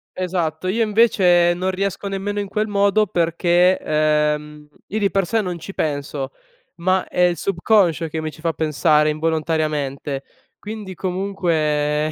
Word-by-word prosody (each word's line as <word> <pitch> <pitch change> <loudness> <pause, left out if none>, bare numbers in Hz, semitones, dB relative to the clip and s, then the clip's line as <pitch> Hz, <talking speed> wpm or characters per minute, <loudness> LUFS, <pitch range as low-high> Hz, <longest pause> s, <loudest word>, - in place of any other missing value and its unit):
Esatto. 180 -2 -2
Io 225 +5 +1
invece 190 -6 +4
non 185 +2 -1
riesco 195 +1 -3
nemmeno 205 +1 -3
in 200 - -5
quel 215 +1 -1
modo 200 +1 +2
perché, 175 +2 +2
uhm, 150 0 0 0.2
io 215 - -2
di 200 -1 +2
per 195 -2 +1
sé 225 +5 +1
non 180 -3 -4
ci 195 +4 -9
penso, 145 -2 -3 0.4
ma 185 +2 0
è 180 - -1
il 175 -1 +3
subconscio 175 -3 +2
che 160 +1 -3
mi 155 - -3
ci 155 - -15
fa 165 0 0
pensare 150 0 +2
involontariamente 155 -3 -1 0.4
quindi, 210 -3 -7
comunque 155 -6 0
175 Hz, 150 wpm, -21 LUFS, 155-195 Hz, 0.4 s, invece